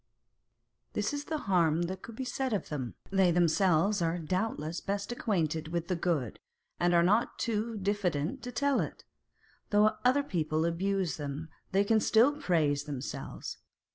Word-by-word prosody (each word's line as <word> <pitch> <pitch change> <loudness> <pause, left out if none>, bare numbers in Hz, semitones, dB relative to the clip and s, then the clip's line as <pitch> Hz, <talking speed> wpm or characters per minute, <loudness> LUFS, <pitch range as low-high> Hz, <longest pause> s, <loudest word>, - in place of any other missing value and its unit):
This - - -1
is 290 0 -3
the 315 - -2
harm 170 -4 +3
that 185 +2 -4
can 230 - -10
be 260 - -4
said 255 0 -2
of 205 - -2
them: 130 -6 -4 0.2
they 190 -2 +4
themselves 175 +3 +3
are 165 +1 +1
doubtless 170 -1 -2
best 200 +2 -3
acquainted 165 -10 -1
with 170 +1 -3
the 180 - +1
good, 165 - -1 0.4
and 175 0 +3
are 170 - +5
not 210 +6 +2
too 225 0 -1
diffident 195 - -1
to 250 - -6
tell 280 +3 +1
it. - - -4 0.7
Though 210 0 +4
other 260 +3 +4
people 160 - 0
abuse 185 0 0
them, 145 +2 -5 0.2
they 195 +1 +3
can 220 +2 +3
still 230 +5 +5
praise 150 - +1
themselves 140 -3 -6
185 Hz, 160 wpm, -30 LUFS, 160-215 Hz, 0.7 s, are